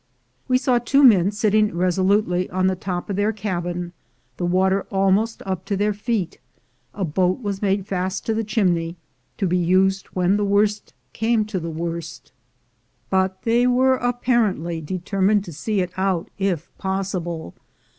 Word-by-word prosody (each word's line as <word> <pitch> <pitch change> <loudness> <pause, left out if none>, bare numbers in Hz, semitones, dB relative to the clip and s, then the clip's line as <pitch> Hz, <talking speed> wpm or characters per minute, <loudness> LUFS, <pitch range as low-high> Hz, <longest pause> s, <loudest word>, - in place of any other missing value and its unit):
We 255 - +3
saw 255 -2 +2
two 275 +4 +3
men 200 -8 +6
sitting 210 -1 +1
resolutely 185 +1 +1
on 185 0 0
the 190 0 +2
top 180 -1 -4
of - - -1
their 205 +2 +2
cabin, 175 -4 -4 0.4
the 175 - -1
water 190 +2 +1
almost 195 +3 +1
up 190 -2 -3
to 200 - -1
their 205 +1 +1
feet; 205 -3 -2 0.6
a 195 - -1
boat 185 - 0
was 200 -2 -3
made 195 -1 0
fast 190 -1 -3
to 225 - 0
the 225 +1 -1
chimney, 180 -6 0 0.4
to 200 - 0
be 180 0 +1
used 190 +2 +2
when 185 +2 +1
the 210 - 0
worst 205 +1 +1 0.2
came 225 -1 +1
to 210 -3 -3
the 165 0 -5
worst, 165 0 -5 0.8
but 190 0 0
they 240 +2 +3
were 260 +1 +3
apparently 230 -9 0
determined 190 +5 0
to 170 - -8
see 200 +7 -1
it 180 0 -3
out 190 -3 -1
if 190 -5 -1
pos 190 0 -2
sible. 170 - -4
190 Hz, 165 wpm, -22 LUFS, 180-210 Hz, 0.8 s, men